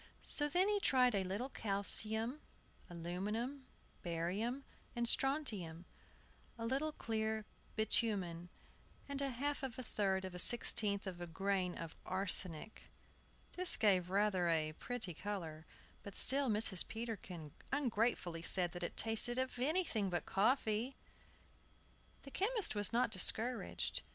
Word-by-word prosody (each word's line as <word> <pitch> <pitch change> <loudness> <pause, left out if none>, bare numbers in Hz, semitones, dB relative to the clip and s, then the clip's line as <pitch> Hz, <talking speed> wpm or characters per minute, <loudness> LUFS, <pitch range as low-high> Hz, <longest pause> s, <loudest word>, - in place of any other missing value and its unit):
So 295 -1 +3
then 360 +6 +3
he 415 0 +1
tried 255 - +3
a 195 -2 0
little 200 +7 -3
calcium, 220 +5 0 0.5
aluminum, 210 +11 -4 0.3
barium, 190 +10 -3 0.3
and 235 0 0
strontium, 210 - +1 0.7
a 230 - -5
little 275 +6 -1
clear 220 -4 -3 0.3
bitumen, 195 -6 +1 0.6
and 280 0 -4
a 275 - -1
half 280 +4 -3
of 265 -4 -5
a 255 - -5
third 190 -4 -1
of 185 - -7
a 180 - -7
sixteenth 210 -1 +4
of 180 -2 -7
a 175 - -5
grain 185 +1 -2
of 165 -1 -7
arsenic. 185 0 0 0.6
This 365 -1 +4
gave 185 -5 +2
rather 195 -3 +1
a 155 -2 +1
pretty 225 -1 -3
color; 165 -5 -6 0.3
but 200 - -10
still 275 0 +3
Mrs. 210 -4 +5
Peterkin 205 -9 -7 0.2
ungratefully 225 - -1
said 175 +1 +2
it 175 -1 -5
tasted 225 +2 +2
of 260 -1 -3
anything 265 - 0
but 175 -1 -3
coffee. 220 +3 0 1.3
The 275 - -11
chemist 425 - +2
was 205 -2 0
not 240 -1 +1
discouraged. 235 +2 +1
215 Hz, 130 wpm, -36 LUFS, 185-250 Hz, 1.3 s, Mrs